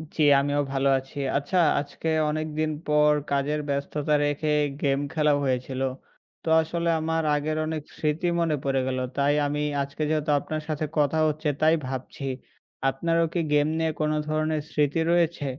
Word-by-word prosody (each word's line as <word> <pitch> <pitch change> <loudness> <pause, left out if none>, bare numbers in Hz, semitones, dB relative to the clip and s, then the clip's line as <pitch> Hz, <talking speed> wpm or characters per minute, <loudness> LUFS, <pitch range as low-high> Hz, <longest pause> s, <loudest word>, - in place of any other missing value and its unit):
জ্বি, 155 - +2 0.2
আমিও 145 +1 0
ভালো 135 0 +1
আছি। 135 +2 -14 0.2
আচ্ছা, 145 +6 -1 0.2
আজকে 145 +3 -6 0.2
অনেকদিন 155 0 -2 0.2
পর, 150 0 +4 0.2
কাজের 140 +2 0
ব্যস্ততা 140 +2 -1
রেখে 145 +1 -1 0.3
গেম 135 -1 +2
খেলা 150 -2 +3
হয়েছিল। 130 0 -2 0.6
তো - - -11
আসলে 170 +1 -2
আমার 160 +1 -1
আগের 155 +1 -1
অনেক 155 0 -3 0.2
স্মৃতি 155 +3 0
মনে 165 -2 +1
পড়ে 135 -1 +1
গেল। 130 0 -1 0.2
তাই 140 +1 +3
আমি 150 +1 -2 0.2
আজকে 140 +2 -5
যেহেতু 155 -1 0
আপনার 155 +1 -4
সাথে 155 0 -1
কথা 150 +1 +2
হচ্ছে 155 +1 -2
তাই 160 +1 +5
ভাবছি। 130 +1 -6 0.7
আপনারও 165 +5 +1
কি 175 - 0
গেম 145 0 +4
নিয়ে 160 -1 +1
কোনো 155 0 +1
ধরনের 155 0 0
স্মৃতি 150 +1 +1
রয়েছে? 170 -3 +1
150 Hz, 160 wpm, -26 LUFS, 140-155 Hz, 0.7 s, তাই